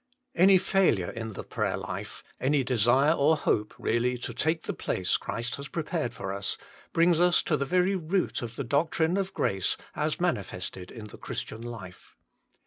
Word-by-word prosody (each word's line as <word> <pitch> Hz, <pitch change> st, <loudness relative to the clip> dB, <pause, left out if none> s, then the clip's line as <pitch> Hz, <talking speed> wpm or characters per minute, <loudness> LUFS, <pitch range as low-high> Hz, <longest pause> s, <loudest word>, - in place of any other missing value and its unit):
Any 190 Hz, -4 st, +7 dB
failure 180 Hz, -, +2 dB
in 110 Hz, -1 st, -5 dB
the -, -, -6 dB
prayer -, -, -1 dB
life, -, -, -6 dB, 0.2 s
any 140 Hz, +1 st, +2 dB
desire 125 Hz, +4 st, +4 dB
INTRODUCTION 165 Hz, -, +1 dB
5 -, -, -6 dB
or 155 Hz, +3 st, +5 dB
hope 105 Hz, -6 st, 0 dB
really 125 Hz, +2 st, +1 dB
to 120 Hz, 0 st, -5 dB
take 160 Hz, +7 st, 0 dB
the -, -, -3 dB
place -, -, -1 dB
Christ 120 Hz, +1 st, -3 dB
has 140 Hz, 0 st, -7 dB
prepared 155 Hz, -5 st, -2 dB
for 95 Hz, 0 st, -4 dB
us, 100 Hz, 0 st, -2 dB, 0.3 s
brings 170 Hz, 0 st, +4 dB
us 175 Hz, 0 st, +5 dB
to 155 Hz, -, +1 dB
the 140 Hz, -2 st, -1 dB
very 185 Hz, +4 st, +3 dB
root 180 Hz, +2 st, -1 dB
of 120 Hz, -1 st, -6 dB
the 140 Hz, -, -3 dB
doctrine 160 Hz, +6 st, +1 dB
of 195 Hz, -1 st, -1 dB
grace 95 Hz, -1 st, +1 dB, 0.2 s
as -, -, -1 dB
manifested 90 Hz, -1 st, -2 dB
in 110 Hz, -3 st, -9 dB
the -, -, -12 dB
Christian 110 Hz, -, -5 dB
life. 115 Hz, -6 st, -9 dB
140 Hz, 185 wpm, -28 LUFS, 115-170 Hz, 0.3 s, Any